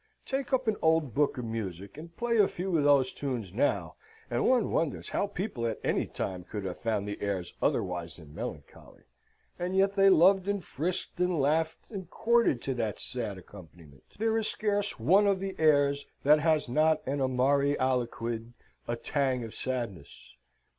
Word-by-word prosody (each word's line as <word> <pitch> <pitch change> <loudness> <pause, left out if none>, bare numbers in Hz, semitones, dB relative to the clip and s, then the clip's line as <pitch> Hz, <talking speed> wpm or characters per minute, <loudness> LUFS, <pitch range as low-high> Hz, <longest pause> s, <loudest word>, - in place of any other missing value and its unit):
Take 270 0 -3
up 260 -2 +1
an 215 -2 +1
old 160 -6 +2
book 145 +2 +1
of 125 - -4
music, 100 -4 -5
and 165 +3 -11
play 235 -1 +1
a 200 - +6
few 180 0 -3
of 150 - +3
those 140 -3 +4
tunes 120 -10 -4
now, 125 +7 0 0.3
and - - +2
one 250 -4 +2
wonders 160 -5 -1
how 205 - 0
people 185 - -3
at 110 - -3
any - - 0
time 90 -2 -4
could 100 +2 -6
have 90 -2 -5
found 110 -3 -1
the 105 - -5
airs 95 -4 -3
otherwise 85 -2 -1
than 75 -4 -14
melancholy. - - -8 0.6
And 180 +2 -2
yet 195 +1 +3
they 195 -1 +6
loved 190 +2 +5
and 200 -2 -1
frisked 175 +6 -4
and 180 -2 +1
laughed 160 +3 +1
and 190 -5 -7
courted 235 - +2
to 135 - -1
that 115 -4 -2
sad 115 -6 -4
accompaniment. 85 -6 -14
There 225 +1 +1
is 220 - -1
scarce 205 - -1
one 190 - +4
of 195 -2 +2
the 195 0 -4
airs 145 -2 +3 0.2
that 150 +2 +6
has 155 -2 +2
not 155 +5 +2
an 140 +1 -1
amari 140 +2 +2
aliquid, 120 -2 -2 0.3
a 120 - -1
tang 130 0 -1
of 115 - -8
sadness. 115 - -6
140 Hz, 180 wpm, -29 LUFS, 115-185 Hz, 0.6 s, a